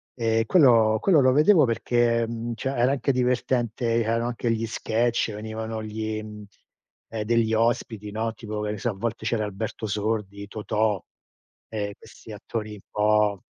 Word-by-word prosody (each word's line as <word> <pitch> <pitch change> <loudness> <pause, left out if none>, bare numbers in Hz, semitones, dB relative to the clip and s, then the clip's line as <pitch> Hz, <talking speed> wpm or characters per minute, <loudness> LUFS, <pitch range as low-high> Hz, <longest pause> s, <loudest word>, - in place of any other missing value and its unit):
Ehm, 115 -1 +1
quello 115 -8 +5
quello 180 -6 +5
lo 130 -1 +5
vedevo 155 +2 +6
perché, 115 0 +1
mhmm, 115 +1 -4
cioè 135 - -3
era 125 0 +2
anche 140 0 +1
divertente, 120 -2 0
erano 115 +2 0
anche 120 -1 -1
gli 115 0 -1
sketch, 115 0 0
venivano 110 +1 -5
gli, 110 0 -4
mhmm, 105 -1 -9 0.7
eh, 110 -1 -3
degli 115 0 +2
ospiti, 110 -2 0
no, 110 +2 -2
tipo, 110 -1 -6
che 105 0 -2
ne 105 - -4
so, 120 - -1
a - - -7
volte 110 +3 -4
c'era 110 -1 0
Alberto 105 +2 -5
Sordi, 100 -1 -2
Totò, 105 -1 -1 0.7
ehm, 105 -2 -3
questi 110 - -14
attori 105 0 -5
un 105 - -10
po' 105 -2 +2
110 Hz, 165 wpm, -25 LUFS, 105-120 Hz, 0.7 s, vedevo